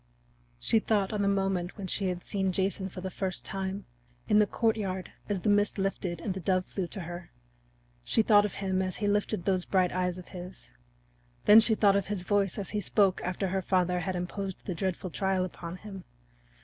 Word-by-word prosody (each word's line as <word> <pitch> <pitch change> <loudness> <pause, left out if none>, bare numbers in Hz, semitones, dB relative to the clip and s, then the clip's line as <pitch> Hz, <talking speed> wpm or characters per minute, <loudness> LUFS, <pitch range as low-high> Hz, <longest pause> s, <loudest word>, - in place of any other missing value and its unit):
She 170 - +2
thought 210 -2 0
on 210 - 0
the 200 - +2
moment 195 -2 0
when 200 - -5
she 190 +1 0
had 180 -1 -3
seen 195 -2 0
Jason 190 +1 0
for 185 - -8
the 190 0 -4
first 190 -1 -3
time 195 0 -4 0.4
in 210 - +5
the 210 - +4
courtyard 200 -5 -1 0.2
as 200 -3 -1
the 210 - +1
mist 205 +1 +3
lifted 190 -3 -2
and 200 - -2
the 190 - -5
dove 185 +1 +1
flew 190 -3 -3
to 195 - -7
her; 175 +1 -7 0.7
she 220 - +3
thought 205 -2 +6
of 210 - -3
him 190 -1 0
as 185 -1 -2
he 205 - -1
lifted 205 -3 0
those 185 -2 +2
bright 185 -2 +2
eyes 180 0 -1
of 180 - -10
his; 180 - -10 0.7
then 210 +2 +10
she 220 0 +4
thought 200 -2 +4
of 200 -2 0
his 200 -3 -3
voice 200 -1 +1
as 200 -3 -4
he 210 - -1
spoke 195 0 +2
after 185 +1 -1
her 190 +1 0
father 180 -1 +1
had 185 +1 -2
imposed 190 +2 -4
the 185 - -2
dreadful 185 +1 -3
trial 190 0 +1
upon 170 -1 -7
him. 195 -1 -9
190 Hz, 210 wpm, -29 LUFS, 180-205 Hz, 0.7 s, then